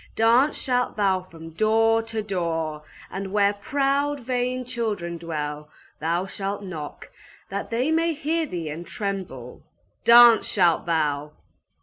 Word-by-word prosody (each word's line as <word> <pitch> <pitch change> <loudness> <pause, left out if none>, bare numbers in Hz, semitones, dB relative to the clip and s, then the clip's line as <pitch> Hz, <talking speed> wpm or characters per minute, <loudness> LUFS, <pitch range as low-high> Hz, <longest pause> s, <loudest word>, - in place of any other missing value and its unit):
Dance 235 +6 +4
shalt 250 -2 0
thou 195 -3 +2
from 165 -2 -12
door 225 +5 +3
to 225 -1 -4
door, 165 -6 -2 0.3
and 195 0 -5
where 205 0 +3
proud, 280 +6 0
vain 250 0 -2
children 205 -9 -3
dwell, 150 -2 -5 0.3
thou 170 +4 0
shalt 195 +1 -4
knock, 160 -6 -8 0.4
that 200 0 -4
they 250 +6 0
may 330 0 +1
hear 315 +2 -1
thee 170 - -4
and 165 +3 -7
tremble! 185 - -5 0.4
Dance 235 -1 +8
shalt 175 -4 +2
thou 150 -3 0
200 Hz, 130 wpm, -24 LUFS, 165-240 Hz, 0.4 s, Dance